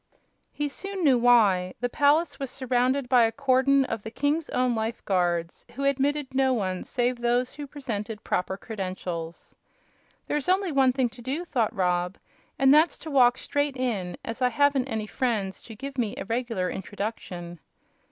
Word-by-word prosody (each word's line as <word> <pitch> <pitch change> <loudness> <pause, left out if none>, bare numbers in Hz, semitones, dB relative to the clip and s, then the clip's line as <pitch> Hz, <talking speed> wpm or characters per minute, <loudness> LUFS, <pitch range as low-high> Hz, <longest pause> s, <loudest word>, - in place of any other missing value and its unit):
He 295 - -2
soon 390 +6 -5
knew 265 -5 +5
why. 205 -7 +4
The 245 - 0
palace 290 +5 +2
was 275 -2 -3
surrounded 255 +1 0
by 245 -1 +5
a 225 - +3
cordon 275 +1 +3
of 225 -4 -4
the 220 - -7
king's 290 +6 -1
own 250 -1 +1
life 225 +1 -3
guards, 175 -3 0
who 275 - -4
admitted 275 0 0
no 265 -1 +3
one 190 -6 -2
save 245 -1 -1
those 245 +1 +1
who 290 -1 -7
presented 225 -6 -5
proper 185 +1 -1
credentials. 185 -6 -6 0.7
"There's 295 +2 -2
only 375 -1 +2
one 270 -2 +4
thing 250 -1 0
to 240 +1 -13
do;" 275 +8 -3
thought 240 -8 0
Rob, 180 -1 0 0.4
"and 270 0 +5
that's 310 +3 +4
to 315 - -8
walk 250 -2 +5
straight 285 -2 -1
in, 215 -9 -2
as 230 +3 -5
I 250 - +4
haven't 285 -1 +2
any 220 -2 -2
friends 210 -4 -2
to 225 - -11
give 275 +3 -6
me 225 -4 -1
a - - -5
regular 230 -4 -1
introduction." 185 -4 -6
245 Hz, 170 wpm, -26 LUFS, 210-275 Hz, 0.7 s, knew